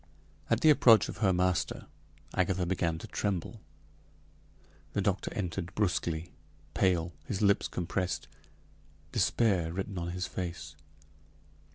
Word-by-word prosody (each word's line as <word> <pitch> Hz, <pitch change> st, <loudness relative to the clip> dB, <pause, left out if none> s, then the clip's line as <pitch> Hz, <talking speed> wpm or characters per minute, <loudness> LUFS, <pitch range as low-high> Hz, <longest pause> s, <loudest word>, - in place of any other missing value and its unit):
At 115 Hz, +1 st, +2 dB
the 155 Hz, -, +7 dB
approach 115 Hz, -7 st, +6 dB
of -, -, -6 dB
her 100 Hz, -3 st, +3 dB
master, 90 Hz, -3 st, 0 dB, 0.5 s
Agatha 95 Hz, 0 st, +1 dB
began 85 Hz, -2 st, 0 dB
to -, -, -8 dB
tremble. 100 Hz, -5 st, -3 dB, 1.3 s
The 100 Hz, -, +1 dB
doctor 100 Hz, 0 st, 0 dB
entered 90 Hz, -3 st, -3 dB
brusquely, 85 Hz, -5 st, -1 dB, 0.4 s
pale, 90 Hz, -2 st, +1 dB
his 100 Hz, 0 st, -2 dB
lips 100 Hz, 0 st, +3 dB
compressed, 90 Hz, 0 st, -2 dB, 0.8 s
despair 95 Hz, -8 st, +2 dB
written 95 Hz, +1 st, -4 dB
on 85 Hz, 0 st, -3 dB
his 90 Hz, +1 st, -3 dB
face. 85 Hz, -6 st, -5 dB
90 Hz, 115 wpm, -30 LUFS, 85-100 Hz, 1.3 s, the